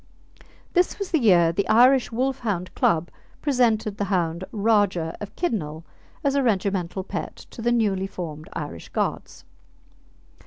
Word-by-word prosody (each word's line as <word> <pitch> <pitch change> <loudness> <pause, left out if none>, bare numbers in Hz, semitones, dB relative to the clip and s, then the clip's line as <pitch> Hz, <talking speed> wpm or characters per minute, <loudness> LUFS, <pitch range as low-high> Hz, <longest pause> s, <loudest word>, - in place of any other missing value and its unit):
This 360 0 +2
was 400 -2 -5
the 320 - +3
year 175 -8 +5
the 195 +4 -1
Irish 250 +3 +5
Wolfhound 230 -7 -2
Club 170 0 +1 0.3
presented 225 -7 +1
the 205 - -1
hound 175 -3 -1
Rajah 200 -6 +1
of 205 - -7
Kidnal 170 - -2 0.4
as 280 -1 +2
a 280 - +2
regimental 195 -5 0
pet - - -5 0.2
to 230 - -9
the 240 +1 +1
newly 200 -5 +1
formed 160 -5 -7
Irish 145 - -6
Guards. - - -3
205 Hz, 140 wpm, -24 LUFS, 175-240 Hz, 0.4 s, year